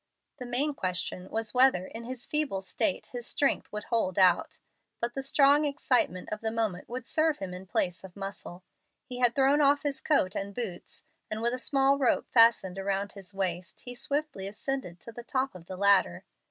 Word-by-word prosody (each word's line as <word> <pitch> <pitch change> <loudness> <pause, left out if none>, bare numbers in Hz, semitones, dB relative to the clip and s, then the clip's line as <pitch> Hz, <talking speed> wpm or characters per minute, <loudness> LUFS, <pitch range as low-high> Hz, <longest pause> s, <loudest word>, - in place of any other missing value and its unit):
The 250 - -6
main 275 +5 +1
question 180 -3 -3
was 220 -1 -3
whether 250 -8 +4
in 230 +4 -9
his 250 0 -4
feeble 300 -11 -1
state 275 +9 -1
his 240 -1 -5
strength 280 - 0
would 210 0 -5
hold 220 -6 -1
out. 185 -2 +4 0.4
But 235 +1 -2
the 270 - -3
strong 280 +2 +4
excitement 255 - 0
of 215 - -4
the 220 - -1
moment 220 -5 -2
would 245 0 -5
serve 315 +2 +1
him 190 -2 -6
in 185 +1 -9
place 180 -1 -1
of 190 -2 -11
muscle. 195 -2 -7 0.4
He 250 -1 -7
had 245 -1 +3
thrown 275 +2 +4
off 285 0 +4
his 280 -2 -2
coat 200 -12 +2
and 200 -1 -4
boots, 205 -8 -4 0.3
and, 215 0 -3
with 235 +2 0
a 255 - -3
small 275 +1 +3
rope 260 - +2
fastened 230 -5 +4
about 200 +1 -1
his 195 -1 -10
waist, 180 -2 -3
he 245 - -8
swiftly 275 -5 -2
ascended 210 -4 -4
to 230 - -10
the 240 - -9
top 260 +3 -1
of 175 -2 -13
the 185 - -7
ladder. 200 - +3
230 Hz, 195 wpm, -29 LUFS, 190-270 Hz, 0.4 s, whether